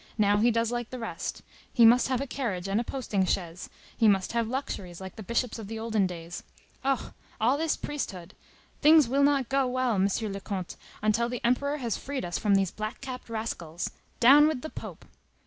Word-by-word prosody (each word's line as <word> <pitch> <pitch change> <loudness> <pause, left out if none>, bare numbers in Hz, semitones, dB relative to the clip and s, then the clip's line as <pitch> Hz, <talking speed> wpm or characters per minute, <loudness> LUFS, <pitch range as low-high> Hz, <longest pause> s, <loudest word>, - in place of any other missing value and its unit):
Now 205 -1 +4
he 225 +3 +4
does 230 0 +1
like 240 -1 -3
the 255 - -6
rest; 230 -2 -5 0.3
he 235 -3 +6
must 240 +2 +6
have 255 -2 0
a 275 - -2
carriage 215 -10 -3
and 200 +4 +1
a - - -3
posting 230 -6 -1
chaise, 180 -2 -2 0.3
he 225 - +3
must 195 -3 +3
have 230 -1 0
luxuries, 200 -9 -4
like 190 -1 -8
the - - -8
bishops 235 +2 -1
of 215 - -7
the 225 +1 -5
olden 220 -3 +1
days. 170 -1 -7 0.4
Oh, 270 -2 -1 0.3
all 240 +5 +3
this 320 +1 0
priesthood! 195 -11 -5 0.5
Things 305 -2 +7
will 275 +4 +1
not 280 -3 +3
go 270 0 +1
well, 255 -1 0
M. 195 -1 +3
le 200 -3 -3
Comte, 190 -3 -5 0.3
until 230 +2 +2
the 245 -1 -3
Emperor 280 +4 +1
has 235 -7 -2
freed 275 -5 -4
us 175 - -2
from 205 -2 +3
these 195 -2 +2
black 215 +1 -5
capped 255 -3 -7
rascals. 180 -7 -4 0.3
Down 285 +5 +8
with 305 -5 -2
the 315 - -6
Pope! - - -9
230 Hz, 205 wpm, -28 LUFS, 195-260 Hz, 0.5 s, Down